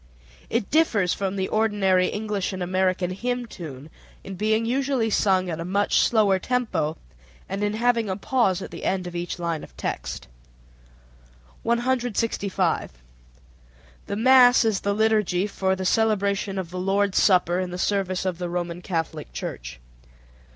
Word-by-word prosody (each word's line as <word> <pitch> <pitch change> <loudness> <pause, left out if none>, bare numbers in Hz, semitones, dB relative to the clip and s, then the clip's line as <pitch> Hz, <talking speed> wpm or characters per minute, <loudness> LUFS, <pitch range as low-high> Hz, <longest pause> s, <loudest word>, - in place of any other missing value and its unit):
It 230 -3 -1
differs 225 - +3
from 195 -1 -2
the 190 -1 -1
ordinary 200 -4 +2
English 210 -2 -2
and 185 -1 -3
American 185 0 0
hymn 245 +5 -2
tune 155 - -9 0.3
in 195 - -7
being 215 +4 +1
usually 260 -2 0
sung 190 -3 +2
at 165 -2 -4
a - - -3
much 200 +4 +1
slower 205 -4 +3
tempo, 185 -11 -1 0.5
and 195 +2 -3
in 205 0 0
having 230 -2 +1
a 190 - -1
pause 200 -5 +1
at - - -8
the - - -8
end 185 -1 -1
of 175 0 -7
each 175 0 -3
line 170 -3 -3
of - - -14
text. - - -4 1.3
165. 230 - 0 1.1
The 200 - -3
mass 245 +1 +6
is 220 -3 +1
the 200 0 -1
liturgy 210 -4 +2
for 190 -2 -1
the 190 0 -5
celebration 200 -2 +1
of 180 -3 -4
the 180 - -4
Lord's 195 +1 +1
Supper 180 -2 +3
in 185 -1 -2
the 180 - -5
service 190 -1 -1
of 180 -2 -2
the 175 -1 -3
Roman 175 0 -3
Catholic 165 - -4
Church. - - -6
195 Hz, 155 wpm, -24 LUFS, 180-220 Hz, 1.3 s, mass